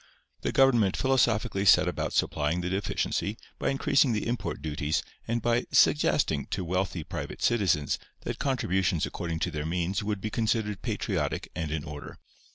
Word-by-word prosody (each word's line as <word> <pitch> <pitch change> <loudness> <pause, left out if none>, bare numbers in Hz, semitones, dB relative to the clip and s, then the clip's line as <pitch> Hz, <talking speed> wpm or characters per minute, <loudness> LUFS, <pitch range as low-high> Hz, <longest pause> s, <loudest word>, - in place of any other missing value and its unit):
The - - -1
government 120 -8 +4
philosophically 115 -7 +2
set 100 - +6
about - - -2
supplying 75 +4 0
the 90 +1 -3
deficiency 100 +2 -1 0.2
by - - 0
increasing 135 -1 +3
the 105 - -1
import 120 +1 -2
duties 75 0 -1 0.2
and 115 0 -1
by 120 +1 +2
"suggesting" 80 - +3
to 90 - -3
wealthy 90 -1 -1
private - - -6
citizens 90 - +2 0.2
that - - -5
contributions 95 - +1
according 85 -2 -4
to - - 0
their 75 0 -3
means 90 +4 -1
would 105 -1 -2
be 110 +2 -4
considered 110 -3 0
patriotic - - -2
and 80 - -3
in 75 -1 -2
order. 75 -1 -8
95 Hz, 160 wpm, -28 LUFS, 80-115 Hz, 0.2 s, set